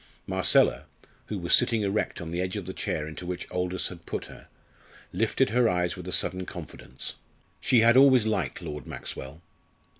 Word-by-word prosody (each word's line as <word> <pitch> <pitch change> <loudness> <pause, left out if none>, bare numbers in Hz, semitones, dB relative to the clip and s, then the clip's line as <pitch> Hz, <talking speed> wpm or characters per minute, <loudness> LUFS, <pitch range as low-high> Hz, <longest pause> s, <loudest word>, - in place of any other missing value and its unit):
Marcella, - - +3 0.4
who 105 - -3
was 85 -2 0
sitting 115 -3 +4
erect 100 0 -1
on 80 -1 -6
the 85 +1 -1
edge 95 +2 -2
of 100 - -5
the 95 - -5
chair 75 -4 -3
into 80 +2 -8
which 90 0 -4
Aldous 90 0 -1
had 85 -2 -12
put - - -4
her, - - -14 0.7
lifted - - +1
her 120 0 +3
eyes 90 -1 0
with 90 -1 -9
a - - -4
sudden 95 +1 +1
confidence. 80 -8 -8 0.4
She 120 - +4
had 115 +1 +5
always 130 -4 +6
liked 110 -4 -2
Lord 75 -4 -6
Maxwell. 70 +6 -7
90 Hz, 180 wpm, -27 LUFS, 85-110 Hz, 0.7 s, always